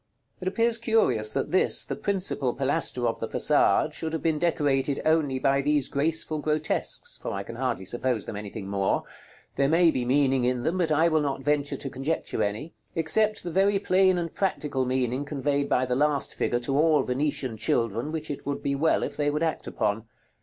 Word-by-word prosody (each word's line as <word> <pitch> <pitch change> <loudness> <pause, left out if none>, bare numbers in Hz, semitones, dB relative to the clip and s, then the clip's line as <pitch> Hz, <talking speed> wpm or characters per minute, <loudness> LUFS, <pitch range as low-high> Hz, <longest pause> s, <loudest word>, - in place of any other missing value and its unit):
It 185 - -5
appears 230 +4 +2
curious, 175 - +1
that 135 - -2
this, 185 - +2
the - - -4
principal 185 -10 -1
pilaster 135 -2 +1
of 115 - -2
the 115 - -3
façade, 150 +3 +3
should 160 +1 -4
have 160 - -3
been 160 -2 +1
decorated 145 -5 +1
only 155 -4 +2
by 135 +1 +2
these 145 -1 +1
graceful 155 +1 0
grotesques, 150 0 0
for - - -4
I 100 - -4
can 115 - -9
hardly 120 -6 -2
suppose 120 +2 -1
them 110 - -6
anything 100 0 -7
more. 100 -1 0 0.5
There 140 0 +2
may 165 +1 +4
be 130 - -2
meaning 135 0 +2
in 125 0 0
them, 175 +6 -1
but 165 -3 +1
I 160 +2 +4
will 155 -2 +2
not 135 -2 -2
venture 145 0 0
to - - -6
conjecture 140 +4 -2
any, 105 +11 -3 0.2
except 210 +7 +2
the 175 - -4
very 195 +3 +3
plain 185 -1 +3
and 170 -2 -3
practical 150 -8 -1
meaning 130 +1 -1
conveyed 145 -1 -1
by 130 - +2
the 125 - -1
last 145 0 +1
figure 120 - 0
to 135 +3 -2
all 155 -1 +4
Venetian 140 -1 -1
children, 115 +5 -1
which 155 -1 -4
it 145 - -6
would 140 0 -4
be 140 - 0
well 155 +4 +1
if - - -4
they 145 -1 0
would 150 +2 -1
act 160 -1 -2
upon. 105 +2 -2
145 Hz, 200 wpm, -26 LUFS, 130-160 Hz, 0.5 s, may